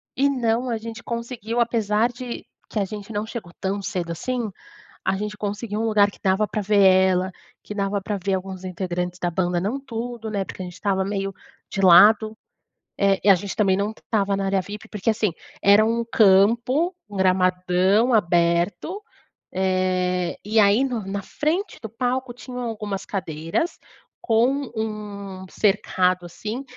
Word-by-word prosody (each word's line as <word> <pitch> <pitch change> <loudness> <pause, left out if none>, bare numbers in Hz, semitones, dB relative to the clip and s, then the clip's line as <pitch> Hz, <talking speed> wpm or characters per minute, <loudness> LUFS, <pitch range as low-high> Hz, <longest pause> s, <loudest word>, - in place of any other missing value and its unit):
E 280 +2 +3
não, 245 -2 0
a 230 - 0
gente 225 0 -8
conseguiu, 235 -1 -4
apesar 225 -1 +2
de 245 0 -7 0.2
que 215 - -2
a 200 - +1
gente 205 +2 -8
não 210 0 -2
chegou 220 -6 -7
tão 195 +1 -2
cedo 175 -3 -3
assim, 235 +6 -2 0.6
a 190 +1 +1
gente 210 +1 -4
conseguiu 210 +1 -3
um - - 0
lugar 205 -2 +4
que - - -18
dava 190 +2 +2
pra 215 - -2
ver 205 0 +3
ela, 190 -1 +4 0.3
que 210 - -7
dava 200 0 -1
pra 205 +1 -3
ver 195 +1 0
alguns 190 0 -5
integrantes 180 -1 -3
da 175 - 0
banda, 175 0 0
não 210 +9 -1
tudo, 235 -3 -5
né? 200 -2 -1
Porque 190 - -8
a - - -4
gente 180 -1 -8
estava 190 0 0
meio 195 0 -2 0.4
de 195 - -3
lado, 210 +4 +7 0.6
eh, 195 -1 +3
e 205 - +4
a 195 - +9
gente 195 +2 -5
também 195 -3 +3
não 200 +2 0
estava 205 -3 -1
na 195 0 -2
área 195 0 +1
VIP 205 +3 -9
porque 210 +1 -2
assim, 215 -3 0 0.3
era 200 +2 +6
um 230 +1 +1
campo, 235 - +4
um 205 - -9
gramadão 185 +4 +3
aberto, 175 - +1 0.5
eh, 185 -1 0
e 220 +2 +2
aí 205 +4 +5
no 245 -6 -2
na 200 +1 -3
frente 330 - -2
do 220 - -6
palco 250 +2 -2
tinham 250 +1 -8
algumas 210 -4 -4
cadeiras 165 - -2 0.4
com 255 +4 +1
um 205 -3 -5
cercado 185 -3 +1
assim, 215 +9 -5
205 Hz, 170 wpm, -23 LUFS, 190-225 Hz, 0.6 s, a